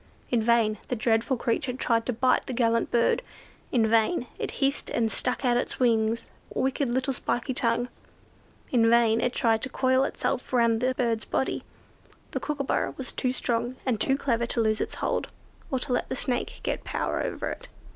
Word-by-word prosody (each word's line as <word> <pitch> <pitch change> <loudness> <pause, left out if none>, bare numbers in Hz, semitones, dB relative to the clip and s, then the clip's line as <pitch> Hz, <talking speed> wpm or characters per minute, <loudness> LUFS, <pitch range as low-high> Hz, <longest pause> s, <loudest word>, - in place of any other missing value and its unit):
In 240 -2 +3
vain 220 -2 +3
the 250 - -1
dreadful 230 +3 +1
creature 250 +2 -1
tried 230 -2 0
to 250 - +1
bite 255 +3 +2
the 260 - -3
gallant 230 -1 +2
bird; 235 - +2 0.5
in 235 -3 +3
vain 230 +6 +2
it - - -2
hissed 275 +1 0
and 225 -1 0
stuck 250 +5 -1
out 240 -1 +3
its - - -2
wicked 235 +3 0
little 260 +2 0
spiky 245 +1 -1
tongue; 240 -1 +1 0.8
in 230 -3 +4
vain 230 -1 +4
it 245 - +1
tried 225 -2 +2
to 275 - -2
coil 260 0 +2
itself 270 -1 -2
round 235 -2 +3
the 255 0 +1
bird's 230 -3 0
body; 265 - -1 0.7
the - - -2
Kookooburra 280 -3 -1
was 265 - -2
too 255 - 0
strong 240 -1 -1
and 235 -5 0
too 270 - +2
clever 235 -4 0
to 240 - -1
lose 220 -1 +2
its - - -2
hold, - - -1 0.4
or 265 - 0
to 250 0 -1
let 245 - -1
the - - -2
Snake 245 -1 -2
get - - -2
power - - -2
over - - -3
it. - - -8
240 Hz, 185 wpm, -27 LUFS, 230-260 Hz, 0.8 s, in